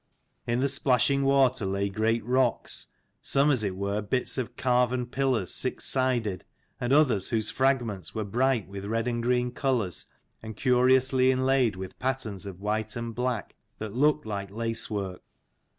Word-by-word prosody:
In 120 +1 +1
the 140 - +3
splashing 140 0 +2
water 135 -3 +3
lay 100 +1 0
great 110 +2 0
rocks, 125 -1 0 0.3
some 140 +2 +3
as 125 -6 +1
it 95 -3 -2
were 100 +2 -2
bits 125 +5 -1
of 125 - -4
carven 125 0 +1
pillars 125 -6 0
six - - -2
sided, 120 -7 0 0.4
and 125 +1 -2
others 130 -10 +3
whose 110 -2 +1
fragments 120 -9 0
were 110 - -1
bright 120 +2 +1
with 100 0 -7
red 115 +3 -1
and 120 -1 -1
green 125 +1 +1
colours, 125 - -1 0.3
and 110 -1 -8
curiously 130 0 +3
inlaid 130 -4 +2
with 95 0 -8
patterns 120 -7 -3
of 95 -2 -8
white 105 +2 -2
and 115 -1 -4
black 125 -2 -2 0.2
that 110 -2 -6
looked 150 +3 +2
like 100 -2 -4
lace 115 +2 -2
work. 95 -4 -4
120 Hz, 160 wpm, -27 LUFS, 105-130 Hz, 0.4 s, the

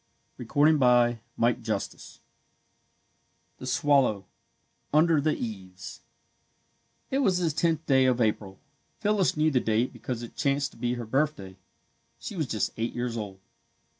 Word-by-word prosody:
THE - - -7
SWALLOW 125 -6 +4 0.2
[Illustration: 115 -3 -2 1.4
The 130 - -7
Swallow] 130 -7 +2 0.7
UNDER 155 0 +4
THE 155 +1 0
EAVES 95 -5 -7 1.1
It 270 - +1
was 195 -10 +2
the 170 -3 +1
tenth 165 +1 0
day 130 -2 +4
of 125 -1 +2
April. 105 -4 -1 0.4
Phyllis 205 -6 +1
knew 155 +1 +3
the 130 - +3
date 115 +2 0
because 120 -2 -5
it 120 - -10
chanced 140 -1 0
to - - -18
be 120 +1 -1
her 120 -1 -5
birthday. 115 -6 -1 0.6
She - - -7
was 155 -6 -2
just 110 -3 -1
eight 115 +1 -3
years 120 -1 -2
old. 100 -4 -6
125 Hz, 135 wpm, -27 LUFS, 115-150 Hz, 1.4 s, SWALLOW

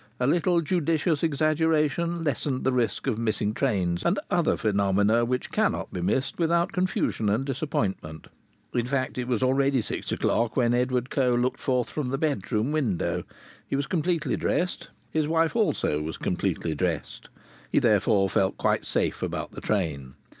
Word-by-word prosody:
A 125 - +1
little 170 +4 +2
judicious 160 -2 0
exaggeration 160 +1 +1
lessened 140 -2 -1
the 130 - +2
risk 120 -2 0
of 120 -5 -1
missing 110 -2 0
trains 95 -9 0
and 180 +4 +2
other 175 -2 +2
phenomena 100 +2 +2
which 125 +1 -2
cannot - - 0
be 90 - -3
missed 130 - -1
without 170 +2 +2
confusion 180 - 0
and 110 +6 +1
disappointment. 105 - -3 0.5
As 120 - +2
a - - -5
fact 130 0 -1
it 125 - -3
was 125 -1 0
already 135 +1 +3
six 110 - -4
o'clock 115 -1 0
when 120 -2 +3
Edward 125 0 0
Coe 125 -3 +2
looked 125 +1 0
forth 125 -2 0
from 145 -5 -2
the 135 - -1
bedroom 130 -4 -1
window. 125 - -1 0.4
He - - -2
was 140 0 0
completely 170 0 0
dressed. 180 +1 -1 0.2
His 155 -2 +1
wife 165 +2 +1
also 195 - +1
was 80 +1 -5
completely 80 - -1
dressed. 85 0 -3 0.4
He - - +1
therefore 105 -4 +3
felt 95 -1 +1
quite - - +1
safe - - -1
about - - -3
the - - -9
train. 75 -10 -2
130 Hz, 165 wpm, -26 LUFS, 105-155 Hz, 0.5 s, already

